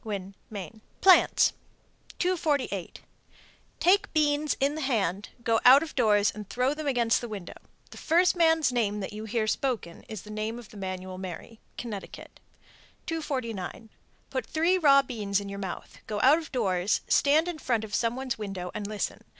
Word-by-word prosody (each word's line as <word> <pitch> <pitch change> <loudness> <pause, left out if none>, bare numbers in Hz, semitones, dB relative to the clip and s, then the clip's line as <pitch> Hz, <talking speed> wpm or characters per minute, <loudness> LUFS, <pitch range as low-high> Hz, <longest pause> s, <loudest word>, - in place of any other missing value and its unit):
Winn, 200 -3 -5 0.2
Me. 215 +1 -8 0.2
PLANTS. 375 -1 +6 0.6
248. 295 - -1 0.8
Take 385 +3 +3
beans 300 -1 +1
in 280 +2 +2
the 315 - -4
hand, 205 - -1
go 225 -1 +2
out 265 +4 +8
of 320 - -8
doors 210 -5 +3
and 210 -2 -9
throw 250 +3 +1
them 305 0 -5
against 240 -4 +2
the 240 - -5
window. 200 -5 -7 0.4
The - - -10
first 355 +3 +3
man's 320 -4 +3
name 210 -4 0
that 190 - -5
you 215 +1 -6
hear 220 0 -1
spoken 220 -6 -2
is 215 -4 -6
the 210 - -11
name 215 +2 -3
of 240 -3 -11
the - - -15
man 185 -1 -4
you - - -10
will 185 0 -7
marry. 190 +4 -8 0.2
Connecticut. 210 -5 -8 0.7
249. 230 - -4 0.4
Put 260 -1 -3
three 330 +4 +2
raw 275 -4 +6
beans 210 -6 -2
in 200 -1 -7
your 200 0 -6
mouth, 190 -3 -7
go 210 -1 -3
out 285 +5 +6
of 320 - -10
doors, 195 -6 +1
stand 305 +4 +4
in 345 -3 -4
front 235 -6 0
of 210 -1 -8
some 230 +1 +1
one's 260 -3 -4
window 195 -4 -5
and 210 -1 -4
listen. 210 -1 -3
230 Hz, 180 wpm, -28 LUFS, 205-285 Hz, 0.8 s, out